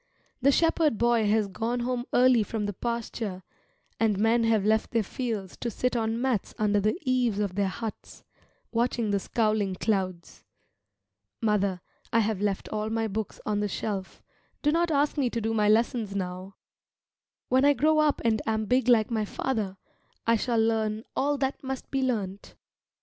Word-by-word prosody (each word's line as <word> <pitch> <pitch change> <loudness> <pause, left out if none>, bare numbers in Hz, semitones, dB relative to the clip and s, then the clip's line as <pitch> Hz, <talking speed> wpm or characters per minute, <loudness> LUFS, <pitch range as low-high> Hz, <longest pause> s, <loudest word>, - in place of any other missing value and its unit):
The 275 +3 +5
shepherd 325 -4 +2
boy 235 -2 +3
has 215 -1 +2
gone 230 +5 -2
home 245 0 -2
early 250 -2 +5
from 210 0 -2
the 205 - -3
pasture, 225 -3 -4 0.6
and 220 -3 +2
men 225 +3 +3
have 220 -3 +2
left 220 +1 +2
their 230 -2 +1
fields 210 -4 -4
to 240 - -3
sit 250 +2 -1
on 225 0 0
mats 250 -5 -1
under 210 -1 +2
the 215 - +1
eaves 250 -5 +1
of 200 -3 -1
their 200 +1 +1
huts, 220 +3 -7 0.5
watching 235 -2 0
the 200 - +2
scowling 215 -2 0
clouds. 185 -4 -2 1.0
Mother, 200 -5 +1 0.3
I 230 - +4
have 210 -2 -1
left 205 -2 -1
all 215 0 -2
my 225 0 0
books 220 +1 -4
on 210 -1 0
the 205 - 0
shelf 195 -1 -4 0.4
do 295 - +3
not 340 +2 +2
ask 290 -1 +1
me 260 -3 +2
to 235 - -2
do 225 0 -1
my 210 -1 +2
lessons 220 -2 +1
now. 185 0 -4 0.9
When 260 +1 +4
I 285 0 +6
grow 310 +4 +3
up 305 -1 +2
and 220 -2 +2
am 220 -1 0
big 250 +4 +2
like 230 -2 +4
my 220 -2 0
father, 210 -4 -2 0.5
I 230 - +4
shall 235 +1 0
learn 220 -1 +1
all 290 +1 +1
that 270 0 -2
must 265 -1 -5
be 270 - 0
learnt. 205 -6 -3
225 Hz, 175 wpm, -27 LUFS, 205-245 Hz, 1.0 s, I